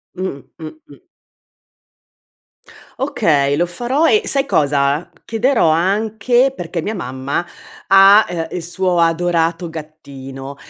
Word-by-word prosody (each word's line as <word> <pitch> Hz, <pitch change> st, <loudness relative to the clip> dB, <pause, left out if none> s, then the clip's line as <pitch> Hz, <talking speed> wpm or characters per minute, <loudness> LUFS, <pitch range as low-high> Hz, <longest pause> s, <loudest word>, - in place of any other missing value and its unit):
Mh-mh, 185 Hz, -7 st, -5 dB, 0.2 s
mh, 160 Hz, -, -7 dB, 0.2 s
mh. -, -, -18 dB, 1.9 s
Okay, 155 Hz, -, +1 dB
lo 175 Hz, -, +1 dB
farò 255 Hz, -, 0 dB
e 430 Hz, 0 st, +3 dB
sai 275 Hz, 0 st, -1 dB
cosa: 140 Hz, +1 st, +1 dB, 0.2 s
chiederò 230 Hz, -, +1 dB
anche 220 Hz, +9 st, +1 dB
perché 170 Hz, -1 st, -4 dB
mia 215 Hz, +5 st, -4 dB
mamma 130 Hz, +1 st, -4 dB, 0.4 s
ha, 195 Hz, +2 st, +7 dB
ehm, 165 Hz, -2 st, -4 dB
il 180 Hz, -, -4 dB
suo 175 Hz, +1 st, -1 dB
adorato 165 Hz, 0 st, 0 dB
gattino 140 Hz, -3 st, -10 dB
175 Hz, 110 wpm, -17 LUFS, 155-215 Hz, 1.9 s, ha